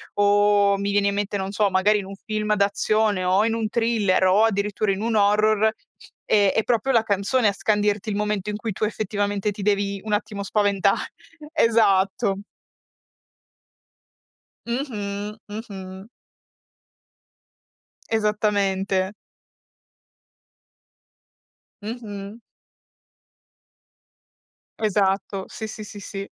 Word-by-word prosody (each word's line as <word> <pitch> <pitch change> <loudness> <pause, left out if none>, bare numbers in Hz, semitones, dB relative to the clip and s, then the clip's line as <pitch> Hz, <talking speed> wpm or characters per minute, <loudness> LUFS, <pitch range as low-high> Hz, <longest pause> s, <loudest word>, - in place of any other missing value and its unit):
O 205 0 +4
mi 200 0 -1
viene 200 0 +2
in 200 - +1
mente, 205 0 -2
non 190 0 -3
so, 205 -1 +2
magari 200 +3 +3
in 195 - -6
un 195 - -8
film 215 -1 -1
d'azione 205 0 +1
o 190 +4 +3
in 225 - +1
un 225 -2 -1
thriller 220 -6 +2
o 195 +4 +4
addirittura 205 -1 +1
in 190 - -2
un 230 0 -1
horror, 215 +1 +3 0.5
è 205 -2 +3
è 220 - +1
proprio 245 +2 +1
la 230 -3 +3
canzone 210 +3 +1
a 200 - +2
scandirti 210 +1 0
il 200 - -2
momento 210 -1 -1
in 210 - -3
cui 220 -2 -4
tu 215 - -5
effettivamente 205 -1 -1
ti 205 - -8
devi 200 -1 0
un 215 - -5
attimo 210 -1 -2
spaventa 200 -1 +2 0.6
Esatto. 200 -4 +2 2.3
Mh-mh, 210 -5 -4
mh-mh. 195 -2 -8 2.0
Esattamente. 205 -3 0 2.7
Mh-mh. 210 -1 -7 2.4
Esatto, 195 -2 0
sì, 220 - -7
sì, 215 0 -8
sì, 205 0 -10
sì. 195 0 -7
205 Hz, 110 wpm, -23 LUFS, 200-215 Hz, 2.7 s, O